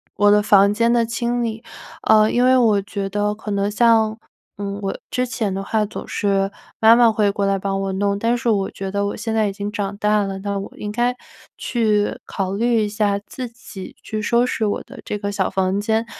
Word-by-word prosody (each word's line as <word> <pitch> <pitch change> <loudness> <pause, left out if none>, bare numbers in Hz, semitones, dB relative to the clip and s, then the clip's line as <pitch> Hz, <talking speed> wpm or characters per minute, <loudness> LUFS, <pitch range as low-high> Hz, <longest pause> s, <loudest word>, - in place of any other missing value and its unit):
我 205 0 +4
的 210 0 +4
房 200 -1 +5
间 230 +2 +2
的 235 -1 +3
清 235 +1 -1
理。 225 0 -4 0.4
呃， 215 0 +5
因 245 +1 +3
为 260 0 +5
我 220 -5 +4
觉 200 -1 -4
得 205 +1 0
可 215 0 -9
能 200 0 0
像 220 -1 +3 0.4
嗯， 200 0 -4
我 195 - -2
之 250 - 0
前 235 -5 -2
的 195 +1 -3
话 215 +2 0
总 - - -8
是 195 -1 0 0.3
妈 225 +1 +7
妈 235 -1 +5
会 210 -2 +2
过 200 0 -1
来 195 0 +2
帮 195 0 -2
我 195 - -2
弄， 200 +1 0
但 230 +3 +1
是 245 0 -4
我 200 -3 +1
觉 195 0 -6
得 200 0 0
我 205 - -3
现 225 - -3
在 220 -1 +2
已 200 - -3
经 205 +1 -5
长 205 -2 -3
大 210 0 +2
了， 195 -1 -4
那 200 0 -3
我 195 - -7
应 210 - -5
该 240 +3 0 0.4
去 215 -4 0
考 190 -1 -3
虑 230 +2 +2
一 - - -2
下 205 -1 0
自 255 -2 -6
己 225 -5 -11
去 215 -1 -4
收 235 +3 +2
拾 225 -3 -1
我 205 - -2
的 - - -13
这 210 - -4
个 205 0 -3
小 195 -2 0
房 190 +1 0
间， 220 +2 0
210 Hz, 245 characters per minute, -21 LUFS, 200-230 Hz, 0.4 s, 妈